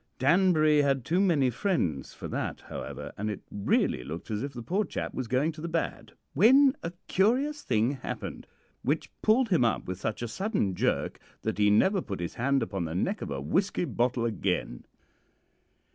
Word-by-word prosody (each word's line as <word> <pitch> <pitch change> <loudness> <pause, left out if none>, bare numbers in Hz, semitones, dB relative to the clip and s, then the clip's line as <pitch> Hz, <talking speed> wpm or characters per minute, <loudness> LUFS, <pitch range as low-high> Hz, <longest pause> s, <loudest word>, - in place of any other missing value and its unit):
Danbury 155 0 +4
had 135 -4 +1
too 175 +8 +1
many 150 -10 +3
friends 115 - -1
for - - -8
that, - - -3
however, - - -7
and 105 +1 -1
it 105 - -4
really 100 -9 +1
looked 80 - -7
as 105 0 -1
if 140 +2 -3
the 120 -3 -8
poor 195 - 0
chap - - -4
was 130 - -3
going 130 +7 +1
to 155 -1 -11
the 170 - -3
bad, 160 -9 -3 0.2
when 265 - +6
a 170 - -3
very 175 - -19
curious 265 +10 +2
thing 110 +4 +1
happened 135 -3 -6 0.3
which 145 +5 -1
pulled 230 +3 +3
him 170 -10 +3
up 115 - +1
with 95 0 -5
such 110 +1 -2
a - - -2
sudden 190 - -1
jerk - - -1 0.2
that - - -2
he 105 0 +5
never 190 - +4
put 95 - -5
his 85 -1 -4
hand 135 +3 +1
upon 95 -4 -3
the 80 +1 -4
neck 90 - -1
of - - -4
a 70 -2 -3
whisky 180 - 0
bottle 120 -4 0
again. 95 - -2
135 Hz, 190 wpm, -28 LUFS, -, 0.3 s, when